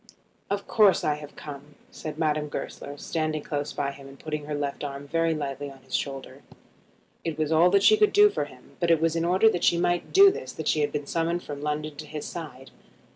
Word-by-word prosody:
"Of 200 0 -2
course 210 -4 +4
I 150 - +2
have 150 -1 -11
come," 145 -1 -10 0.2
said 155 -1 -7
Madame 155 -2 0
Goesler, 145 0 -6
standing 155 -1 -2
close 145 -1 -3
by 140 - -2
him 140 0 -12
and 135 0 -13
putting 150 -1 -4
her 150 0 -3
left 145 0 -3
arm 140 0 -5
very 165 +1 +1
lightly 145 -1 -4
on 135 -1 -15
his 130 - -15
shoulder. 135 -1 -3 0.8
It 165 -3 -3
was 155 0 -1
all 165 +3 +5
that 200 +1 +3
she 430 - +7
could 425 0 +4
do 415 0 +6
for - - -1
him, - - -17
but 170 - +1
it 165 -2 +5
was 165 0 +1
in 165 0 0
order 185 +5 +4
that 175 - -3
she 170 - +4
might 175 0 0
do 390 0 +8
this 460 +4 -7
that - - -5
she 155 - +2
had 145 - 0
been 145 -1 -3
summoned 170 +3 -1
from 145 -1 -7
London 150 0 -3
to 155 0 -8
his 150 0 -6
side. 135 -6 -8
155 Hz, 235 wpm, -26 LUFS, 145-170 Hz, 0.8 s, do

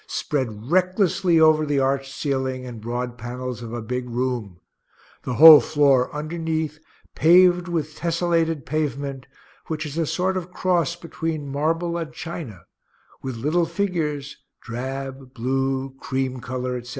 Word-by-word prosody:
spread 120 -3 -3
recklessly 185 -1 +3
over 155 -1 +5
the 145 -1 0
arched 135 0 0
ceiling 130 -2 -2
and 120 -3 -8
broad 120 +1 -4
panels 125 +1 -5
of 115 -1 -7
a 120 -1 -5
big 125 +2 -4
room 120 -7 -3 0.6
the 125 - -3
whole 155 +2 +11
floor 140 -4 +3
underneath 155 0 -3 0.3
paved 180 +2 +5
with 155 -3 -3
tesselated 165 -3 0
pavement, 140 -2 -3 0.4
which 155 0 -3
is 150 +2 -4
a 165 - 0
sort 185 +4 0
of 180 -1 -4
cross 175 -3 0
between 165 -3 -4
marble 165 +4 0
and 160 -2 -5
china, 150 - -7 0.6
with 130 -2 -5
little 160 +8 +1
figures, 150 -8 -2 0.2
drab, 135 +2 -6
blue, 135 +2 -1
cream 130 -1 -2
color, 125 +1 -3
etc.) 125 0 -9
145 Hz, 140 wpm, -23 LUFS, 125-165 Hz, 0.6 s, whole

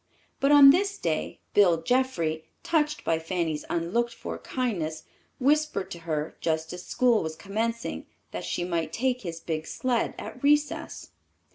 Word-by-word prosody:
But 275 +1 +3
on 285 -1 +10
this 400 +5 +1
day, - - -2
Bill 175 -5 +4
Jeffrey, 180 -12 0 0.2
touched 300 -2 +1
by 165 -1 +1
Fanny's 165 -2 -2
unlooked 230 +8 0
for - - -6
kindness, 170 -12 -3 0.4
whispered 295 -6 +1
to 170 - -6
her, 155 0 -2
just 160 0 -1
as 180 0 -7
school 245 -3 +3
was 160 -1 -4
commencing, 230 +6 -3 0.2
that - - -5
she 175 - -2
might 170 -2 -2
take 255 0 0
his 170 -3 -5
big 160 -1 -4
sled 250 -3 -1
at 250 - -8
recess. 295 +1 +1
205 Hz, 150 wpm, -27 LUFS, 165-260 Hz, 0.4 s, on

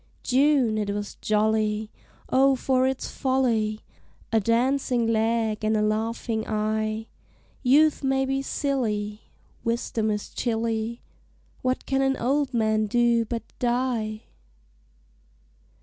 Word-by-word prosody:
June 260 -4 +3
it 205 -1 -2
was 205 0 -3
jolly, 215 0 +1 0.4
O 270 +1 +4
for 260 0 +1
its 265 0 -2
folly! 230 -5 0 0.5
A 225 - +4
dancing 245 +2 +1
leg 225 -1 0
and 215 0 +2
a - - +1
laughing 220 +1 -1
eye! 215 0 -1 0.6
Youth 290 +4 +4
may 270 0 +2
be 270 0 -1
silly, 220 -7 -2 0.3
Wisdom 230 -1 -1
is 210 -1 -2
chilly, 230 0 -2 0.6
What 255 0 -1
can 270 0 +1
an 270 0 +1
old 275 +3 0
man 220 -2 +1
do 235 +1 +2
but 230 0 -4 0.2
die? 240 -3 -1
230 Hz, 115 wpm, -25 LUFS, 215-260 Hz, 0.6 s, O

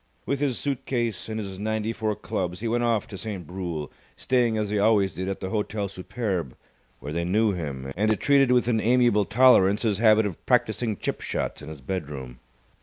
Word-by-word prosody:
With 140 - -1
his 140 -4 0
suit 135 -2 -3
case 115 -7 -2
and 110 0 -3
his 95 -3 -6
ninety 110 +1 -1
four 110 -2 -1
clubs 90 -1 -4
he 115 - -2
went 120 +1 0
off 115 -3 +1
to 95 - -7
Saint 100 -6 -5
Brule, 85 -4 -5 0.3
staying 120 -3 +1
as 105 -1 -1
he 105 - +1
always 100 -3 +3
did 95 +2 -4
at 95 - -4
the 95 -1 -4
Hotel 105 -1 -2
Superbe, 95 - -4 0.4
where 75 - -6
they 85 +1 -1
knew 105 +5 +2
him, 70 -7 -5
and 105 +1 +1
treated 140 -3 +4
with 125 -2 +3
an 115 -3 +2
amiable 120 -3 +3
tolerance 105 -4 +5
his 105 -3 +1
habit 110 -1 +5
of 95 -5 -5
practising 115 -3 +1
chip - - -3
shots - - -3
in 75 - -9
his 75 -3 -9
bedroom. 70 -6 -5
105 Hz, 200 wpm, -25 LUFS, 90-115 Hz, 0.4 s, tolerance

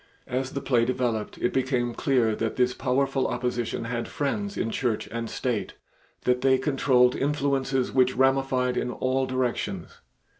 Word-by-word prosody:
As 130 +1 -3
the 140 - -3
play 120 -3 +2
developed, 120 -3 -1
it 120 - -1
became 125 -2 0
clear 120 -4 +1
that 115 0 -2
this 125 0 +2
powerful 135 +1 0
opposition 120 -2 -2
had 115 0 -3
friends 200 +8 -2
in 115 - -1
Church 120 -4 -1
and 115 0 -4
State, 120 -5 -2 0.5
that 125 0 +2
they 130 0 +4
controlled 130 -2 +3
influences 135 -2 0
which 130 -1 +3
ramified 130 -1 +2
in - - -1
all 130 +1 0
directions. 130 -2 -2
130 Hz, 150 wpm, -26 LUFS, 120-135 Hz, 0.5 s, they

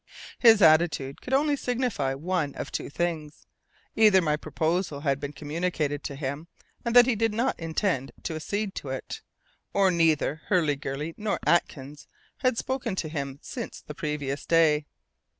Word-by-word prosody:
His 225 -4 +7
attitude 155 -4 +3
could 255 - -8
only 290 +1 +2
signify 245 - -1
one 160 -1 -2
of - - -6
two - - -4
things 155 -1 -3 0.5
either 215 -3 +6
my 155 -4 +1
proposal 160 0 -2
had 140 -2 0
been 145 0 -5
communicated 150 -1 -2
to 140 - -4
him, 140 +3 -4 0.4
and 235 0 -2
he 250 - +2
did 225 +1 +1
not 235 +3 0
intend 165 -4 -1
to - - -3
accede 200 +6 -3
to 140 - -5
it; 130 0 -5 0.5
or 195 -2 +4
neither 160 -3 +2
Hurliguerly 150 -3 0
nor 210 -1 -1
Atkins 145 -4 0 0.3
had 255 -3 +1
spoken 245 -6 -2
to 160 -4 -3
him 140 -3 -4
since 235 -4 -6
the - - -9
previous 150 -5 -4
day. 155 -3 +3
160 Hz, 150 wpm, -27 LUFS, 145-200 Hz, 0.5 s, His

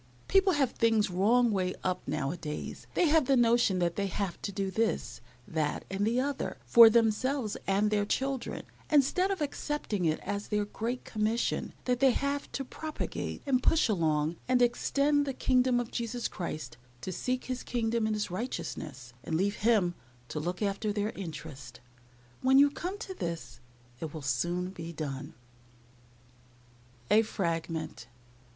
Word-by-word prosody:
People 385 -1 +4
have 275 -4 +2
things 220 -3 +2
wrong 225 +6 +3
way 185 -2 0
up 185 0 0
now 140 -1 -1
a - - -4
days. 150 -2 -6
They - - +4
have 310 -4 +4
the 270 - +4
notion 235 -4 +4
that 175 -1 0
they 200 -1 0
have 195 -2 -3
to 200 - -3
do 195 0 -2
this, 220 - -1 0.3
that, 155 -2 -1
and 200 +2 0
the 235 +2 +2
other, 280 +1 -2
for 230 -1 +9
themselves 230 +1 +1
and 200 +2 +2
their 210 -1 +2
children, 270 +2 -2 0.3
instead 305 +6 +3
of 385 -4 -2
accepting 285 - -2
it 155 -1 +1
as 205 +1 -4
their 210 -1 0
great 235 +4 -4
commission 220 +2 -1
that 250 -1 +1
they 270 0 +6
have 280 +2 -2
to 270 - -3
propagate 310 +4 -5
and 260 -3 +2
push 320 +1 +3
along 160 -5 +1
and 250 0 +3
extend 285 +4 +2
the 270 - -2
kingdom 255 -1 +3
of 240 -1 -4
Jesus 235 0 -2
Christ, 155 -9 -5 0.2
to 185 - -4
seek 250 +8 -2
His 255 -1 -3
kingdom 230 -2 0
and 215 - 0
His 210 -3 -2
righteousness, 150 - -5
and 160 - -2
leave 200 +3 0
Him 210 -6 +3 0.4
to 150 - -3
look 175 +6 -3
after 205 +1 0
their 210 +1 -1
interests. 150 -8 -8 0.6
When 265 +1 +5
you 285 +1 +7
come 360 +7 -4
to 400 -3 -6
this 165 - -5 0.4
it 160 +1 -6
will 155 - -6
soon 175 +7 -1
be 170 -3 -7
done. 140 -4 -5 1.8
A 220 - +7
FRAGMENT. 165 - -3
215 Hz, 165 wpm, -30 LUFS, 175-255 Hz, 1.8 s, for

